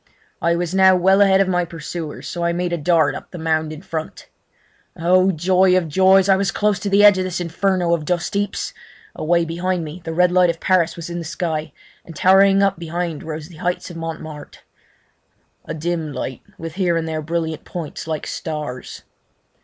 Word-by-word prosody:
I 170 -1 +2
was 175 0 -2
now 190 -1 +6
well 190 +2 +4
ahead 195 -1 +5
of 195 - +2
my 180 -1 +1
pursuers, 165 -1 -7
so 175 - -4
I 170 0 +1
made 175 0 -2
a - - 0
dart 165 +1 +3
up - - -8
the 180 - -9
mound 160 -1 -1
in 155 +2 -9
front. 160 -3 -6 0.7
Oh 185 +3 +3
joy 185 +2 +3
of 175 -3 0
joys! 190 +4 +4
I 195 - +5
was 195 0 0
close 210 -1 0
to 205 - -3
the 200 +1 +4
edge 205 -2 +7
of - - 0
this 185 -1 -3
inferno 175 0 0
of 165 -3 0
dustheaps. 200 +4 -2 0.4
Away 170 +1 +1
behind 175 +1 -2
me 155 +4 -8
the 165 - -4
red 180 +2 +3
light 180 -1 +4
of 165 -1 -2
Paris 175 -3 +2
was 170 0 -7
in 175 - -4
the - - -5
sky, 160 -2 -3 0.3
and 165 - -12
towering 195 +3 +5
up 195 -4 +1
behind 170 -1 -4
rose 155 0 -7
the 170 - -14
heights 180 +2 -3
of 170 - -9
Montmarte—a 155 -2 -11
dim 160 -1 -3
light, 130 -2 -5 0.2
with 165 -1 -7
here 175 -2 +1
and 165 0 -2
there 160 -1 -3
brilliant 160 0 -3
points 165 -2 -7
like 155 -2 -3
stars. 150 -5 -6
170 Hz, 195 wpm, -20 LUFS, 160-185 Hz, 0.7 s, edge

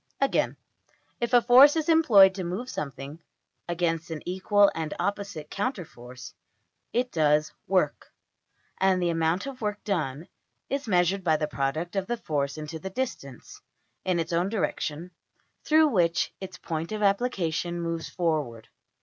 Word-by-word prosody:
Again, 275 - +1 0.6
if 235 - -2
a 245 -2 +5
force 260 +5 +7
is 315 -2 -1
employed 230 - +6
to 190 -1 -5
move 190 +9 -4
something 140 +2 -6 0.5
(against 165 -1 -1
an 160 -2 -6
equal 195 +3 +3
and 160 -2 -4
opposite 200 -7 -3
counter 205 -3 -2
force), 125 -1 -12 0.6
it 245 +1 -1
does 150 -1 +2 0.2
\emph{work}; 185 -7 0 0.7
and 190 -1 +3
the 175 -1 +1
amount 165 +4 0
of 270 -2 -8
work 210 -1 -3
done 160 -6 -2 0.4
is 275 -2 -2
measured 185 0 +2
by 160 -3 +3
the 150 - -1
product 150 +6 -3
of 195 -1 -1
the 240 - -2
force 145 -6 -2
into 155 +1 -6
the 190 - -6
distance 190 - -6 0.4
(in 180 -2 0
its 165 +1 -3
own 175 +3 +1
direction) 180 -5 -3 0.5
through 310 0 +4
which 170 -8 +1
its 190 -1 -7
point 165 +1 -4
of 215 -1 -3
application 180 -5 0
moves 165 -1 -3
forward. 150 -10 -2
175 Hz, 150 wpm, -26 LUFS, 160-205 Hz, 0.7 s, force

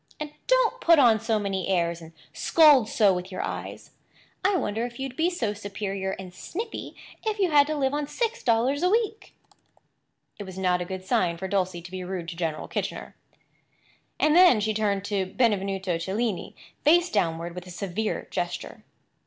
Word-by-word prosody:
"And 300 -1 -5 0.2
don't - - +2
put 335 -1 +6
on 235 -6 +5
so 225 0 0
many 195 -3 -2
airs 170 -2 0
and 165 0 -11 0.2
scold 290 -9 +5
so 205 -4 +4
with 180 +1 -5
your 185 - -3
eyes. - - -6 0.5
I 390 +1 +3
wonder 220 -6 -2
if 240 0 -6
you'd 265 -1 -4
be 330 +4 +2
so 235 - -2
superior 200 -2 -4
and 185 -2 -8
snippy 435 - -6 0.3
if 435 -1 -1
you 380 -4 +1
had 290 -1 +6
to 310 - -1
live 270 -2 0
on 295 0 -1
six 470 +7 -2
dollars 250 +5 +2
a 360 - +3
week." 440 +1 -1 1.0
It - - -4
was 190 -1 -9
not 180 -1 +1
a - - -3
good 185 0 -6
sign 170 -2 +1
for 190 - -4
Dulcie 185 -3 -1
to 180 - -11
be 185 -1 -5
rude 180 -2 -5
to 170 - -7
General 165 -3 -3
Kitchener. - - -4 1.0
And 305 +1 +3
then 355 -10 +7
she 215 +1 0
turned 205 -2 0
Benvenuto 195 -3 0
Cellini 200 +3 -2 0.3
face 345 +4 +4
downward 170 -4 -1
with 180 +1 -8
a - - -10
severe 195 +4 -3
gesture. - - -4
205 Hz, 180 wpm, -26 LUFS, 185-290 Hz, 1.0 s, then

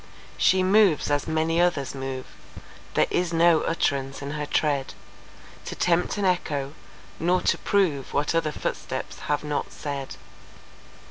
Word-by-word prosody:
She 185 0 +3
moves 190 -6 +4
as 145 -1 0
many 160 +1 +1
others 155 -6 +1
move; 135 -1 -5 0.7
There - - +4
is 175 -1 0
no 165 -1 +5
uttrance 140 -4 -1
in 140 - -4
her 150 -1 -3
tread 145 -4 0 0.7
To - - -5
tempt 175 +3 +1
an 205 - 0
echo, 145 -6 0 0.5
nor 180 +2 +2
to - - +1
prove 165 -10 +1
What 145 +3 0
other 165 -2 +1
footsteps - - -4
have 145 0 +1
not 150 -1 -3
said. 140 -2 -5
155 Hz, 140 wpm, -25 LUFS, 140-175 Hz, 0.7 s, no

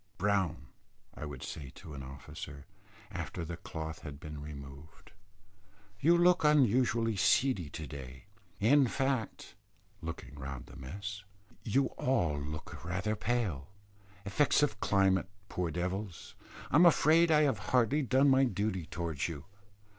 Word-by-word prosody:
"Brown," 95 -7 0 0.5
I - - -7
would 70 -3 -7
say 70 -4 -6
to 80 - -10
an 70 - -7
officer, 70 +1 -9 0.5
after 85 - -4
the 85 +1 -5
cloth 80 -2 -6
had 70 -2 -8
been 75 -1 -7
removed, 70 0 -10 0.9
"you 170 +7 +5
look 175 0 +4
unusually 125 -6 +3
seedy 100 - +2
to 80 +2 -6
day; 65 +1 -9 0.3
in 135 +6 +5
fact," 135 -3 -2 0.5
looking 80 -2 -6
round 70 -3 -7
the - - -14
mess, 100 +8 -6 0.4
"you 135 +5 +2
all 85 - +1
look 75 +2 -7
rather 90 +5 -1
pale; 105 - -1 0.6
effects 145 +9 +3
of 105 -8 0
climate, 95 -2 +2 0.2
poor 90 -2 -1
devils. 90 +2 -4 0.4
I 145 - +5
am 175 +2 +8
afraid 165 +1 +5
I 155 -1 +5
have 140 -3 +1
hardly 125 +4 +3
done 135 +1 +3
my 135 0 +5
duty 100 - -1
towards 80 -5 -2
you. 80 -3 -7
95 Hz, 140 wpm, -32 LUFS, -, 0.9 s, am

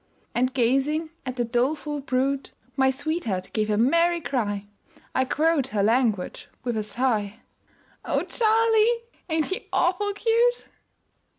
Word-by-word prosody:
And 255 +2 +1
gazing 275 +6 +1 0.2
at 255 - -3
the 240 -1 0
doleful 285 +5 -1
brute 270 0 -1 0.2
My 265 -1 +4
sweetheart 265 - -2
gave 215 -1 0
a 210 - +2
merry 335 +9 +3
cry 225 -8 -2 0.5
I 260 - +2
quote 305 0 +1
her 210 -6 0
language 220 -4 +1 0.2
with 240 -1 -2
a 215 - 0
sigh 215 -1 -1 0.6
"O - - 0
Charlie, 455 +1 +3 0.3
ain't 320 -1 +1
he 380 - -4
awful 410 +4 +1
cute?" 470 +3 +2
265 Hz, 130 wpm, -25 LUFS, 235-335 Hz, 0.6 s, My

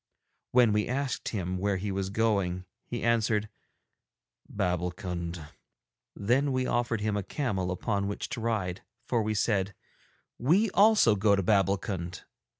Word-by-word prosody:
When 120 -4 +5
we 105 0 +1
asked 135 +1 -2
him 95 -3 -3
where 100 0 0
he 100 +2 -3
was 95 0 -2
going, 100 -4 0 0.2
he 120 - -4
answered 110 -2 +1 1.0
'Babbulkund.' 90 -3 -3 0.7
Then 130 +7 +1
we 130 -1 0
offered 120 -3 0
him 105 -1 0
a 105 - 0
camel 95 -3 -2
upon 100 +2 -1
which 100 - -4
to 120 - -4
ride, 100 -6 -1 0.2
for 120 -2 +1
we 110 0 -1
said, 100 -2 0 0.6
'We 185 - +3
also 205 - +5
go 100 +1 +4
to 100 - 0
Babbulkund.' 95 -3 0
105 Hz, 140 wpm, -29 LUFS, 95-115 Hz, 1.0 s, When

